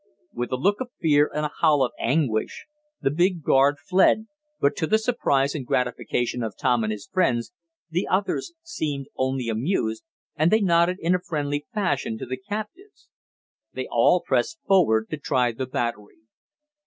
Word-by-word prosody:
With 120 0 -4
a - - +1
look 200 - +1
of 255 - -4
fear, 150 -2 +3
and 150 0 -2
a 150 - -3
howl 150 -4 +4
of 125 - -1
anguish, 125 -4 0 0.4
the 135 - +1
big 175 +1 +1
guard 140 +2 +4
fled, 195 +5 +3 0.3
but 140 - +2
to 160 - 0
the 220 - +4
surprise 145 - +1
and 150 - -4
gratification 125 0 -1
of 110 -2 -4
Tom 120 -2 +1
and 110 - -1
his 105 -2 -6
friends 120 - 0 0.3
the 175 +3 -2
others 200 - -1
seemed 150 - -3
only 130 -2 -1
amused, 115 - -1 0.3
and 155 +1 +3
they 220 - +4
nodded 175 -1 +3
in 170 +2 +2
a 180 - +2
friendly 145 -3 -3
fashion 145 - -1
to - - -6
the 130 +1 -4
captives. 215 - -7 0.6
They - - -4
all - - +4
pressed 330 - 0
forward 130 - +3
to 155 - -2
try 125 -4 +1
the 130 +3 -5
battery. 120 -4 -4
145 Hz, 170 wpm, -24 LUFS, 125-180 Hz, 0.6 s, howl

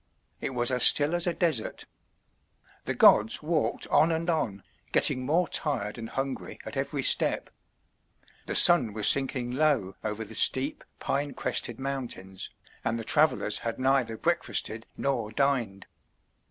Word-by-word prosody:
It 130 - -5
was 120 +1 +1
as 125 -1 -1
still 145 +5 +6
as 175 0 +2
a 175 - 0
desert. 160 -11 -2 1.0
The - - -3
gods 110 +7 +4
walked 160 0 -2
on 160 +3 +3
and 165 +2 -1
on, 110 -12 -3 0.3
getting 130 - +2
more 170 +4 +1
tired 120 -8 -2
and 115 0 -8
hungry 135 0 -5
at - - -8
every - - -3
step. - - +2 1.0
The - - -4
sun 145 - +7
was 105 -1 0
sinking 130 -3 +2
low 135 -9 0
over 110 0 -4
the - - -11
steep, 135 +3 +3
pine 140 +1 -3
crested - - -2
mountains, 125 -9 -6 0.3
and 115 - -2
the 115 - -6
travellers 155 +7 +1
had 115 -1 -5
neither 130 -4 0
breakfasted 115 -9 -2
nor 120 -6 -3
dined. 120 -7 -2
130 Hz, 145 wpm, -26 LUFS, 115-150 Hz, 1.0 s, sun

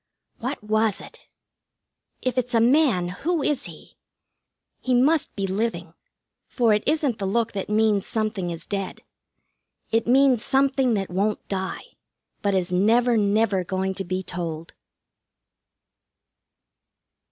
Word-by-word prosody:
What 255 0 -4
was 215 -1 +1
it? - - -14 1.0
If 255 0 0
it's 250 0 -2
a - - +5
man, 235 - +3
who 310 - -2
is 285 -3 0
he? - - -12 0.9
He 255 -1 0
must 290 +5 +2
be 195 - -2
living, 190 -4 -2 0.5
for 235 -4 +2
it 210 - +2
isn't 290 -6 +1
the 195 - -2
look 230 +3 0
that 195 -1 -5
means 210 -2 +2
something 215 -5 -2
is 170 -1 -6
dead. 195 -2 -4 0.9
It 225 0 +1
means 255 -2 +4
something 270 -3 +2
that 195 -3 -3
won't 200 +3 -1
die, 190 -1 -3 0.6
but 200 -1 +1
is 180 -1 0
never, 230 +6 +3
never 205 -2 +2
going 190 +1 -2
to 195 - -4
be 185 +1 -3
told. 165 -2 -5
215 Hz, 130 wpm, -24 LUFS, 190-245 Hz, 1.0 s, a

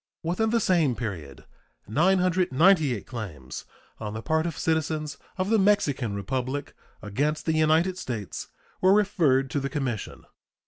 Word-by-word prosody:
Within 180 +7 0
the 230 +1 +2
same 170 - +2
period 85 - -6 0.4
998 175 - +3
claims 80 - -7 0.3
on 105 -1 -5
the 110 - -5
part 160 +1 +1
of 165 - -5
citizens 155 -2 -1 0.2
of 190 +3 -1
the 225 - +4
Mexican 145 - +2
Republic 130 +7 -3 0.3
against 145 +9 -1
the 160 - +1
United 160 +4 +2
States 115 - -5 0.3
were 185 +1 +6
referred 155 -11 +2
to 145 - 0
the 140 0 -3
commission. 130 -8 -4
150 Hz, 135 wpm, -26 LUFS, 120-180 Hz, 0.4 s, were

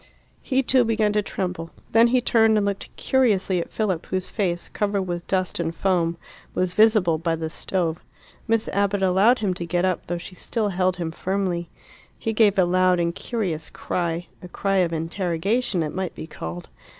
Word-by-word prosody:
He 265 -1 +1
too 255 0 +4
began 220 -2 +1
to 210 - +2
tremble. 180 -4 -4 0.2
Then 230 +1 +6
he 250 +1 +2
turned 225 -2 +4
and 205 - +2
looked 200 -1 -3
curiously 205 -8 +2
at - - -7
Philip, 190 -7 -1
whose 185 -1 -3
face, 175 -5 -1
covered 200 -2 -1
with 175 -2 -4
dust 185 -2 -1
and 165 -1 -2
foam, 170 -2 +1 0.4
was 180 -1 0
visible 215 -7 +4
by 165 0 0
the 160 -1 -4
stove. 170 -2 -2 0.5
Miss 225 0 +1
Abbott 200 0 +1
allowed 195 +7 +4
him 190 - +1
to 175 - -5
get 175 +2 0
up, 185 -2 -1
though 175 - -2
she 170 +2 -9
still 215 +3 -2
held 185 -1 +1
him 170 -2 -3
firmly. 180 -1 -2 0.5
He 225 - -2
gave 210 -2 +4
a 185 - +5
loud 185 0 +3
and 170 0 0
curious 185 -8 -3
cry 170 -1 -2 0.2
a 180 - -8
cry 195 +2 -1
of 180 -3 +2
interrogation 180 +5 -1
it 150 - -4
might 185 -1 -3
be - - -6
called. 85 - -7
185 Hz, 185 wpm, -24 LUFS, 170-210 Hz, 0.5 s, Then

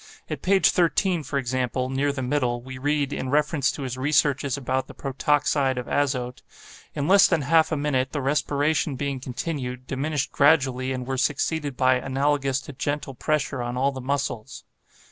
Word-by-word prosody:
At - - -4
page 195 +1 +4
13, 175 0 +2
for 145 -1 -3
example, 130 0 -1
near 140 +2 +1
the 135 -2 -4
middle, 125 -2 0
we 130 0 -8
read, 145 0 0
in 130 - -3
reference 150 -1 +2
to 140 - -6
his 130 -1 -4
researches 140 -1 +1
about 130 -1 -2
the - - -12
protoxide 140 -1 +1
of 125 - -3
azote: 130 -3 -1 0.5
'In 145 0 -1
less 195 +2 +7
than 165 -5 +1
half 160 +2 +3
a 160 - 0
minute 135 -3 0
the 150 - -2
respiration 145 +1 0
being 140 0 -3
continued, 125 -1 -5
diminished 140 +1 -2
gradually 135 -3 +3
and 130 -1 -3
were 130 0 -2
succeeded 145 0 -1
by 130 0 +4
analogous 135 +1 0
to 145 - -10
gentle 145 0 -3
pressure 140 -1 -1
on 120 +1 -3
all 135 +2 +2
the 130 -1 -7
muscles. 130 -4 -3
140 Hz, 175 wpm, -24 LUFS, 130-145 Hz, 0.5 s, less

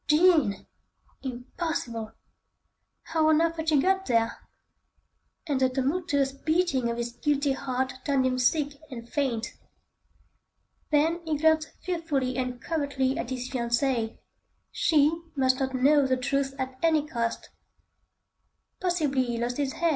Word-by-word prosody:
Jean! 300 - +4 0.6
Impossible! 245 -3 -4 0.9
How 320 -1 +1
on 310 0 +5
earth 330 0 +1
had 320 0 -1
she 300 -3 +4
got 385 +5 +1
there? 230 -1 +2 1.1
And 285 -5 0
the 260 - +4
tumultuous 275 +1 0
beating 275 -3 0
of 235 - -2
his 235 0 -3
guilty 285 +2 0
heart 260 -1 -2
turned 275 -3 +2
him 255 0 +1
sick 285 +3 +1
and 235 -3 -8
faint. 240 -4 -1 1.4
Then 320 +3 +2
he 315 -2 -1
glanced 315 +1 +2
fearfully 310 -8 -1
and 250 -1 -2
covertly 280 -3 -1
at 235 - -3
his 255 -1 -4
fiancée. 235 -2 0 0.5
She 315 +1 +3
must 260 -1 +2
not 265 -1 -1
know 280 +2 +4
the 260 0 +2
truth 270 +1 -1
at 260 -1 -4
any 315 -3 +3
cost. 235 -6 -3 1.3
Possibly 310 -8 +1
he 240 -1 -3
lost 240 +1 -2
his 280 -2 -1
head! 340 0 +1
275 Hz, 135 wpm, -27 LUFS, 255-315 Hz, 1.4 s, on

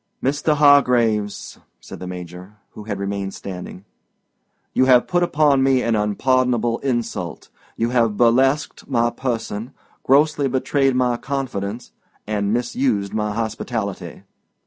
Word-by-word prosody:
"Mr. 145 +3 +1
Hargraves," 125 -8 +3 0.2
said - - -11
the 90 - -7
Major, 90 +2 -9 0.2
who 105 - -11
had 100 -2 -4
remained 100 0 -4
standing, 90 0 -8 0.9
"you 130 - +3
have 125 -2 +5
put 175 0 +1
upon 150 -5 +3
me 130 -1 +3
an 115 -1 +1
unpardonable 120 +2 +1
insult. 120 -4 -3 0.3
You 115 +1 0
have 115 -4 +1
burlesqued 135 +5 +2
my 120 -2 +1
person, 115 -1 -4 0.3
grossly 145 +1 +3
betrayed 135 +1 +1
my 125 -1 +1
confidence, 120 -5 -4 0.3
and 105 -1 -1
misused 120 -3 -1
my 105 -1 -1
hospitality. 110 -2 -4
120 Hz, 125 wpm, -21 LUFS, 105-135 Hz, 0.9 s, have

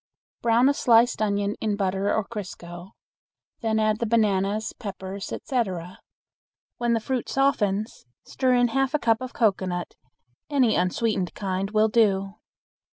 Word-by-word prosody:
Brown 235 +2 +4
a 285 - +4
sliced 235 -3 +3
onion 205 0 0
in 215 -2 0
butter 195 0 0
or 220 - 0
crisco. 180 -4 -8 0.7
Then 220 -1 0
add 215 0 +1
the 235 - -1
bananas, 210 -1 +1
peppers, 195 -1 -7
etc. 185 -9 -3 0.8
When 240 -1 +1
the 230 - +2
fruit 250 +2 -3
softens 215 - 0 0.2
stir 255 -2 +1
in 245 -1 +3
half 270 +4 0
a - - +5
cup 230 -2 +2
of 255 -1 -6
cocoanut; 190 -5 0 0.6
any 265 -6 +3
unsweetened 185 +1 0
kind 195 0 -2
will 215 +1 +3
do. 195 -3 +2
215 Hz, 140 wpm, -25 LUFS, 195-235 Hz, 0.8 s, a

